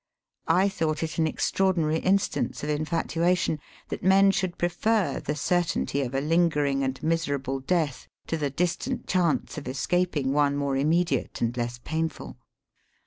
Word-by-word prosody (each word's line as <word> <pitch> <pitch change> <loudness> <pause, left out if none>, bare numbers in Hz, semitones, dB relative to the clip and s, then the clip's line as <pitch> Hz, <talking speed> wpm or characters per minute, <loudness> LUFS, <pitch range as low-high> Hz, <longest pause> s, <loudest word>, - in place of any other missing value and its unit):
I 180 +4 +4
thought 160 -5 -1
it 160 0 -4
an 160 - +3
extraordinary 165 -2 +1
instance 195 -3 0
of 150 - -1
infatuation, 165 +2 0 0.3
that - - -4
men 195 +1 +6
should 185 -2 -2
pre 175 - +1
fer 210 +3 0
the 150 - -3
certainty 170 -3 0
of 130 -1 -3
a 135 - +1
lingering 150 -3 +2
and 135 0 -1
miserable 140 -5 -1
death, 150 -1 -1 0.2
to - - -2
the 150 -3 -1
distant 180 - -2
chance 175 -4 0
of 145 - -11
escaping 140 +1 0
one 145 -1 +2
more 140 -1 0
immediate 165 +6 +1
and 120 +1 0
less 120 0 -3
painful. 160 -5 -4
160 Hz, 150 wpm, -26 LUFS, 140-175 Hz, 0.3 s, men